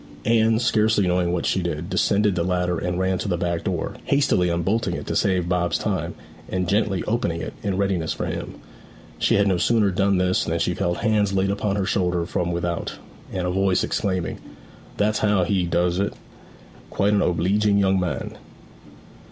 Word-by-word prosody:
Anne, 115 0 +3
scarcely 110 -3 +2
knowing 90 -1 +1
what 90 -1 -1
she 95 - +1
did, 85 -1 -3
descended 105 +1 +2
the 85 - -1
ladder 90 -1 0
and 90 0 -2
ran 95 0 0
to - - -3
the 90 -3 0
back 85 -1 -2
door, - - -2
hastily 140 -11 +2
unbolting 90 +3 0
it - - -6
to - - -3
save 90 -2 +1
Bob's 90 -1 +1
time, 85 -5 -2 0.3
and 90 -1 -1
gently 100 -1 +1
opening 105 -7 -1
it - - -5
in 100 -2 -2
readiness 95 -5 0
for - - -3
him. - - -5 0.6
She - - +3
had 100 0 +3
no 95 -2 +2
sooner 105 +1 +2
done 100 +1 +2
this 90 0 +2
than 85 0 -1
she 85 +2 0
felt 85 0 -2
hands 105 -3 +2
laid 95 0 +1
upon 100 0 -1
her 100 -2 0
shoulder 90 -3 0
from 90 -1 -2
without, 85 0 -3 0.4
and 90 -1 -2
a 90 - 0
voice 95 0 +2
exclaiming, 95 -4 -2 0.6
'That's 105 +1 +1
how 105 -3 +2
we 90 -2 0
doos 90 +1 +1
it 100 - -1 0.8
quite 100 +1 +1
an 105 - +3
obleeging 100 +4 +2
young 95 -1 +3
man!' 90 -3 -4
95 Hz, 185 wpm, -23 LUFS, 90-100 Hz, 0.8 s, Anne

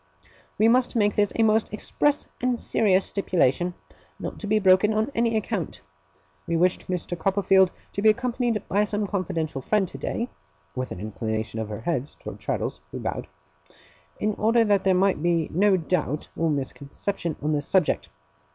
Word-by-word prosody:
We 220 - +4
must 250 +2 +3
make 205 -3 +3
this 205 -1 +2
a 225 - +3
most 220 0 +2
express 290 +7 0 0.2
and 250 -1 +1
serious 195 -3 +3
stipulation, 175 -2 +1 0.4
not - - -6
to 210 - -5
be 215 +1 +3
broken 195 +2 +4
on 220 +5 0
any 230 -1 +1
account. 205 - -3 0.7
We 170 - +1
wished 180 +2 +1
Mr. 180 -1 -2
Copperfield 190 +1 +3 0.2
to 200 - -3
be 220 - +6
accompanied 240 -1 0
by 205 +2 +2
some 205 0 -1
confidential 165 -7 -2
friend 200 +7 +1
today,' 235 +7 -3 0.5
with 130 0 -3
an - - -6
inclination 110 +2 -3
of 110 -1 -4
her 105 0 -6
head 145 0 -1
towards - - -9
Traddles, - - -2
who - - -6
bowed, - - -4 0.9
'in 215 0 0
order 230 +2 +4
that 205 -3 +2
there 190 -1 +4
might 190 -3 +2
be 170 -2 +1
no 195 +3 +4
doubt 160 -4 -2
or 165 0 0
misconception 150 +4 -3
on 150 +2 -1
this 145 -2 -1
subject. 185 -5 +1
190 Hz, 170 wpm, -25 LUFS, 160-215 Hz, 0.9 s, be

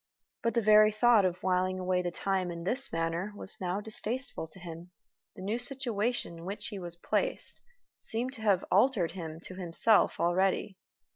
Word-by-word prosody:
But 230 - -1
the 235 - +2
very 215 0 +6
thought 215 -1 +4
of 180 0 -2
whiling 185 0 0
away 185 0 0
the 175 - -2
time 185 +1 -2
in 170 -1 -6
this 260 +9 +3
manner 165 +4 -2
was 195 - -2
now 180 +2 -2
distasteful 230 -2 -3
to 165 - -12
him. 170 0 -9 0.5
The 185 - -9
new 215 +5 -2
situation 240 -8 -2
in 165 - -10
which 200 +3 -5
he 205 -3 -7
was 175 -2 -4
placed - - -2 0.3
seemed 245 +3 +1
to 235 - -9
have 200 -4 +2
altered 200 -4 +3
him 165 -3 -7
to 185 - -9
himself 185 +4 +4
already. 190 +2 0
190 Hz, 175 wpm, -30 LUFS, 175-220 Hz, 0.5 s, very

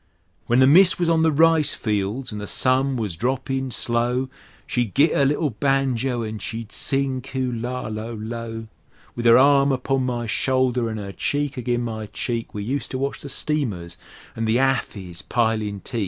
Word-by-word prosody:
When 120 - +3
the 130 - +6
mist 180 +8 +6
was 175 -1 +1
on 165 -1 +3
the 160 0 +3
rice 160 0 +4
fields 105 +4 -2
an' 105 - -5
the 105 - -6
sun 130 +1 +2
was 105 -8 -3
droppin' 130 +5 -2
slow, 120 +2 0 0.4
She'd 120 -6 -2
git 150 +3 +4
'er 140 - +3
little 145 +1 +1
banjo 130 -1 0
an' 110 -1 -5
she'd 115 0 -6
sing 135 -1 -1
"Kulla 125 -2 -3
lo 110 +2 -5
lo!" 115 +1 -6 0.5
With 120 0 0
'er 115 - +8
arm 140 +1 +5
upon 130 0 0
my 120 -1 -2
shoulder 125 0 +1
an' 110 - -4
'er 100 -2 -6
cheek 145 +6 -2
agin' 120 -1 -1
my 110 -2 -5
cheek 115 +2 -4
We 105 - -5
useter 130 +2 -3
watch 140 +1 -3
the 140 - -7
steamers 115 - -2 0.4
an' 115 - -2
the 110 +1 +1
hathis 110 -9 -1
pilin' 110 -4 -1
teak. 120 - -4
125 Hz, 175 wpm, -23 LUFS, 115-135 Hz, 0.5 s, er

